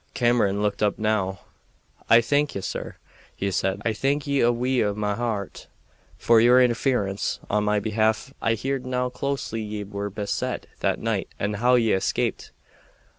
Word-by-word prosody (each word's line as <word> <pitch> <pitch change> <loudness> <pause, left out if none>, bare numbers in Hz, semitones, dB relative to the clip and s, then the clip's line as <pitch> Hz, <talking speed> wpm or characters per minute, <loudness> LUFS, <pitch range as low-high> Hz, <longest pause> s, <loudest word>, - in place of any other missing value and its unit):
Cameron 115 -5 +2
looked 105 -1 -1
up 105 -1 +1
now. 105 -3 -1 0.7
"I 115 - +7
thank 145 +5 0
ye, 100 - -3
sir," 95 - -5 0.4
he 100 0 -2
said. 95 +2 -1
"I 115 - +1
thank 140 +5 0
ye 140 -3 +1
wi' 120 +2 +2
a' 105 -1 -1
my 105 -1 -1
hairt 110 -3 -4 0.5
for 115 -1 +4
your 120 +2 +6
interference 120 -5 +1
on 105 0 +1
our 105 0 +2
behalf. 110 +4 0
I 115 0 +2
heerd 130 +3 -3
how 125 0 0
closely 125 -3 -3
ye 105 -1 -4
were 100 0 -5
beset 100 +1 -3
that - - +1
night - - -2
and 105 +1 -1
how 125 +3 +4
ye 115 -3 +3
escaped. 95 - -1
110 Hz, 165 wpm, -24 LUFS, 105-125 Hz, 0.7 s, I